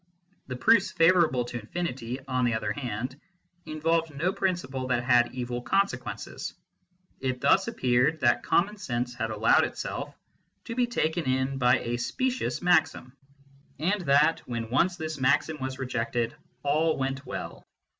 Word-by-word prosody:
The 130 - -4
proofs 205 - +4
favourable 165 -7 +3
to 120 0 -5
infinity, 125 -1 -4
on 130 -1 0
the 120 -2 +2
other 105 -1 -2
hand, 125 +4 -4 0.5
involved 165 +1 0
no 175 +7 0
principle 140 -10 -2
that 125 -1 0
had 120 -1 +4
evil 125 -1 -4
consequences. 195 +11 -2 0.6
It 130 -1 -2
thus - - +3
appeared 130 +5 +1
that 120 -1 +3
common 205 +10 +1
sense 125 -9 -3
had 115 -1 -3
allowed 110 +1 +4
itself - - -4 0.5
to - - -6
be 245 0 +1
taken 170 -7 -1
in 130 +1 0
by 125 -1 +4
a 120 +1 -2
specious 255 - -2
maxim, 155 -7 +2 0.6
and 185 +7 0
that, 145 +3 +4
when 115 -2 -4
once 175 +8 +2
this 155 -3 -5
maxim 145 +4 +2
was 130 0 -4
rejected, 120 -2 -2 0.3
all 155 +3 +2
went 135 +1 -2
well. - - -7
130 Hz, 145 wpm, -27 LUFS, 125-165 Hz, 0.6 s, proofs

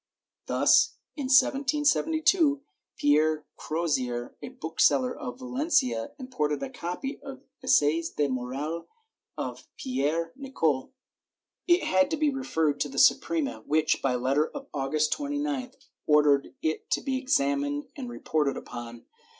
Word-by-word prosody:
Thus, - - +4 0.2
in 285 -4 -4
1772, 295 +3 +3 0.3
Pierre 155 +1 +2
Crozier, 130 -7 -2
a - - -6
bookseller 250 +3 +1
of 250 -1 -6
Valencia, 255 - 0
imported 150 - -2
a - - -5
copy 180 - -5
of 270 -1 -9 0.2
the 260 - -11
Essais 160 0 +3
de 145 - 0
Morale 135 +6 -4 0.5
of - - -5
Pierre 165 - -1
Nicole. 165 - -1 0.8
It 350 0 +4
had 185 0 +3
to 320 - -1
be 305 -1 +2
referred 160 - -1
to 145 - -1
the 135 - -9
Su - - +8
prema, 155 -9 -3
which, 155 +1 +2
by 130 -2 +1
letter 135 +5 +1
of 285 -2 -8
August 150 +2 0
29th, 290 -3 -3 0.3
ordered 150 -2 +3
it 155 0 -2
to - - +1
be 265 -1 -1
examined 145 - 0
and 255 -4 -6
reported 150 -11 -1
upon. 120 0 -8
160 Hz, 135 wpm, -27 LUFS, -, 0.8 s, Su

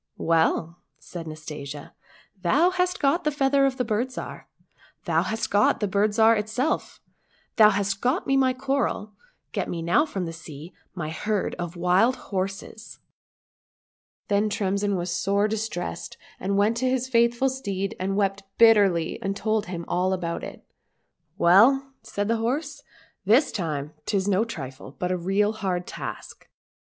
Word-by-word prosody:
" - - -51 0.2
Well,"lsaidjNastasia, 155 -3 -3 0.2
" 190 - -29
thou 300 - +3
hast 360 0 0
got 290 +5 +2
the 305 - +2
feather 275 -1 +2
of 260 -1 -3
the 250 - 0
Bird 225 +3 0
Zhar, - - -7 0.6
thou - - +2
hast 225 +1 -3
got 205 +2 +3
the 210 - 0
Bird 200 +2 +2
Zhar 225 0 +6
itself, 220 +8 -2 0.6
thou 215 -2 +8
hast 195 -1 -1
got 260 +9 +1
me 270 - +2
my 265 -1 +4
coral, 260 -5 -2 0.4
get - - -2
me 170 -1 -4
now 180 - +3
from 195 -10 -3
the 165 - -5
sea 160 +1 -10 0.2
my 155 -4 -4
herd 210 +4 -1
of 175 0 -4
wild 180 +8 +3 0.2
horses! 195 +3 -4 0.4
" - - -
— - - -67
Then 205 +1 +2
Tremsin 200 0 0
was 175 -1 -2
sore 200 +3 +1
distressed, 210 - -4 0.2
and 195 +1 -1
went 210 +3 +2
to 255 +1 +1
his 255 0 0
faithful 235 +1 +3
steed 200 -7 -3
and 195 +1 -1
wept 200 -1 0 0.2
bitterly, 200 -8 +4
and 195 0 -2
told 215 -1 0
him 170 -2 -5
all 185 +1 +1
about 170 -2 -3
jit. - - -9 0.4
" - - -48 0.3
Well," 260 +11 +5
said 205 0 -3
the 230 +1 +1
horse, 250 +8 -2 0.2
" - - -35
this 230 +9 +4
time 155 -7 -3
'tis 195 -1 0
no 205 +2 +2
trifle, 135 - -8
but 180 0 -2
a - - +1
real 195 +4 +1
hard 185 -4 -2
task. - - -8
200 Hz, 165 wpm, -25 LUFS, 180-235 Hz, 0.6 s, thou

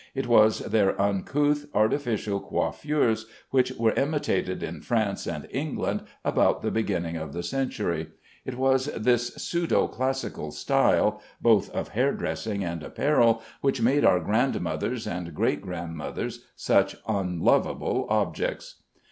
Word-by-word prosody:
It 135 -1 -1
was 110 -2 +5
their 100 -4 +1
uncouth 145 +10 +1
artificial 110 -2 +1
coiffures 115 -4 0 0.2
which 130 -1 +3
were 115 -3 +2
imitated 145 +2 0
in - - -5
France 110 -4 -1
and - - -4
England - - -2 0.2
about - - +2
the - - 0
beginning 90 -7 -1
of 80 0 -6
the 85 - -4
century. 85 - -2 0.4
It 130 -1 -6
was 130 +1 +2
this 120 +1 +2
pseudo 170 -1 +1
classical 130 +2 -3
style 105 0 +2 0.2
both 115 -4 +4
of - - -4
hair - - +1
dressing 95 +6 -3
and 85 -2 -4
apparel 115 - +2 0.2
which 135 -2 +1
made 135 +5 +3
our 90 - +5
grandmothers 110 +1 -1
and 85 -2 -5
great - - +1
grandmothers 85 -4 -5
such - - +2
unlovable 95 -5 +1
objects. - - -1
110 Hz, 130 wpm, -26 LUFS, 90-130 Hz, 0.4 s, was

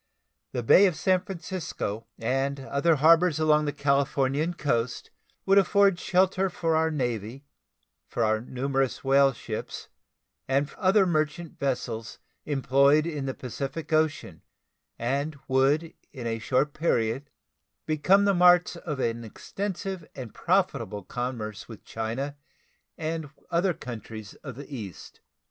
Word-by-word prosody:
The 120 - -3
Bay 195 - +7
of 180 - -1
San 185 +2 +2
Francisco 170 - -5
and 135 +4 -1
other 140 +5 +2
harbors 165 +3 +5
along 150 -1 +3
the 145 - 0
Californian 140 +3 +1
coast 120 -6 -1 0.3
would 195 +1 +6
afford 200 -1 +3
shelter 190 +1 +2
for 165 -2 0
our 160 0 +2
Navy, 125 -2 -3 0.6
for 120 - -1
our 110 0 +2
numerous 135 +2 -2
whale 135 0 +5
ships, 110 -3 -6 0.6
and 140 +2 +1
other 195 0 +4
merchant 155 0 -1
vessels 120 -5 -3 0.3
employed 140 +1 +3
in 150 -5 -3
the 130 - -3
Pacific 135 +5 -5
Ocean, 155 - 0 0.6
and 140 +5 -2
would 140 +5 +2 0.2
in 130 -5 -8
a 115 -1 -2
short 135 +5 +1
period 135 -3 0 0.6
become 180 +6 +3
the 200 - +4
marts 180 -1 +5
of 155 -4 -5
an 115 -2 -1
extensive 190 - -5
and 125 -5 -8
profitable 140 - 0
commerce 120 -2 -5
with 110 - -11
China 120 +6 -4 0.6
and 160 -1 -3 0.2
other 175 +1 +2
countries 110 -3 -8
of 135 -6 -7
the 140 +1 -8
East. 100 -8 -9
140 Hz, 130 wpm, -27 LUFS, 125-165 Hz, 0.6 s, Bay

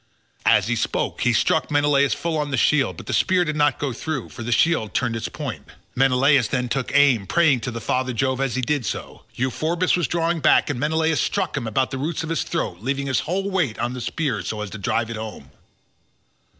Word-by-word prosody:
As - - +5
he 120 +3 0
spoke - - -2
he 125 - +3
struck 145 +6 +1
Menelaus 145 -4 +3
full 165 -1 -2
on 150 -1 -1
the 130 - -1
shield, 130 - +2
but - - -9
the - - -4
spear 185 -1 +2
did 155 -2 -2
not 145 -1 +2
go 140 -3 -2
through, 140 +1 -4
for - - -10
the 120 +1 -4
shield 115 - +2
turned 120 -3 0
its 115 - -3
point. - - -6 0.3
Menelaus 135 0 +3
then 125 -2 -1
took 130 +1 -2
aim, 135 -9 +4
praying 145 - +3
to 115 +1 -5
father 130 +2 -1
Jove 130 +2 -1
as 135 -4 -1
he 130 - -1
did 145 +1 0
so; 110 - -6
Euphorbus 160 +8 0
was 175 -6 0
drawing 170 0 0
back, 150 - +4
and 130 - -4
Menelaus 160 +2 +1
struck 190 -5 -1
him 130 -5 -3
about 130 +4 0
the 130 - -4
roots 155 +4 -2
of 160 - -5
his 165 - 0
throat, 155 - -3
leaning 135 +5 -2
his 135 -2 +1
whole 195 +3 -2
weight 165 - 0
on 120 +1 -2
the 125 - -6
spear, 125 - -2
so 105 +4 -4
as 105 - -5
to 110 - -7
drive 115 +4 -1
it 115 - -5
home. 110 -11 -8
135 Hz, 225 wpm, -22 LUFS, 120-155 Hz, 0.3 s, As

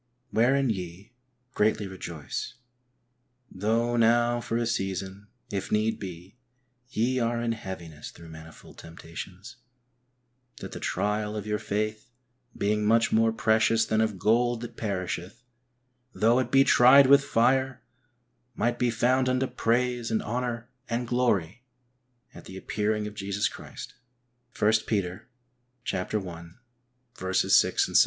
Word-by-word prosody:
Wherein 130 +2 +3
ye 95 +2 -7 0.4
greatly 105 -2 +1
rejoice, 85 - -6 1.0
though 115 +5 0
now 120 +1 +3
for 115 - -2
a 120 - 0
season, 95 -2 -3 0.2
if 100 -2 -4
need 110 +1 +1
be, 95 +4 -9 0.5
ye 125 +2 0
are 115 0 0
in 120 0 -1
heaviness 85 -8 -7
through 85 -1 -14
manifold 80 0 -13
temptations, 85 +4 -10 1.0
that - - -8
the - - -7
trial 105 +1 -1
of 105 -1 -4
your 105 0 -1
faith, 110 +3 -3 0.5
being 105 +1 0
much 115 +2 +3
more 115 0 +3
precious 115 0 +2
than 110 0 +1
of 110 -3 0
gold 115 +4 +2
that 120 - -8
perisheth, 95 0 -4 0.7
though 115 +5 +3
it 130 - -1
be 135 0 +5
tried 135 +1 +7
with 140 +1 +6
fire, 130 +1 +1 0.7
might 120 +2 0
be 125 - +2
found 130 +3 +2
unto 130 +1 +1
praise 120 -1 0
and 110 -1 0
honour 120 0 -3 0.2
and 120 +1 -2
glory 120 -5 0 0.7
at - - -12
the 95 - -9
appearing 105 +2 -1
of 105 - -6
Jesus 100 0 -1
Christ - - -9 0.7
(i 105 - +4 0.2
Peter 95 -4 -2 0.7
i. 105 +5 -7
6, 95 - +2
7). - - +3
110 Hz, 130 wpm, -27 LUFS, 95-120 Hz, 1.0 s, tried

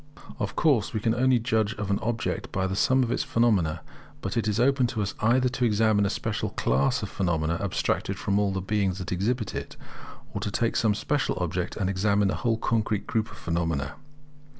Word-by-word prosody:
Of - - -3
course 135 -11 +2
we - - +1
can 115 +1 +1
only 130 +1 +3
judge 110 -2 0
of 105 -1 -3
an 100 - +1
object 115 -3 -2
by 95 0 0
the 95 0 -2
sum 130 +6 +3
of 120 - -2
its - - +1
phenomena; 105 -10 +1 0.4
but 100 - -3
it 115 -2 0
is 105 +1 0
open 130 0 +3
to 110 -3 -2
us 100 - -3
either 125 +4 +3
to 130 0 -3
examine 110 -2 +3
a - - -1
special - - -2
class 65 +2 +1
of - - -3
phenomena 85 -3 0
abstracted 100 -4 -1
from 100 +1 0
all 100 -1 +1
the 95 0 -2
beings 100 -2 0
that 90 - -5
exhibit 110 +5 -1
it, - - -6 0.6
or - - -3
to - - -1
take 115 +3 0
some 110 -2 +2
special 145 +6 -1
object, 90 0 -2
and 95 - -1
examine 100 +1 +2
the - - 0
whole 115 -3 +1
concrete 110 -2 0
group 110 -2 -1
of - - -12
phenomena. 80 -5 -2
105 Hz, 210 wpm, -26 LUFS, 95-115 Hz, 0.6 s, only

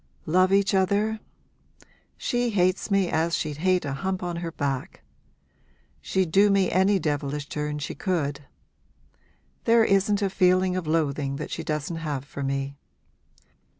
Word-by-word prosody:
'Love 185 +3 +3
each 200 +1 +3
other? 200 +3 +1 1.0
she 245 0 0
hates 185 -1 +1
me 195 -2 +2
as 165 +1 0
she'd 150 -2 -3
hate 185 +2 +1
a 140 - -2
hump 190 +6 -3
on 175 -1 -3
her 170 -1 -4
back. 140 +1 -4 1.0
She'd 190 -4 -1
do 200 +4 +5
me 195 -2 +2
any 190 +2 +3
devilish 145 -3 -2
turn 150 0 -3
she 145 - -4
could. 150 -7 -2 1.2
There 230 -1 +5
isn't 200 +1 +2
a 195 - +1
feeling 185 0 +3
of 185 -4 -3
loathing 145 -3 0
that 150 +2 -6
she - - -4
doesn't 155 +2 -3
have 145 -4 -4
for 140 - -8
me! 135 0 -2
175 Hz, 150 wpm, -25 LUFS, 150-195 Hz, 1.2 s, do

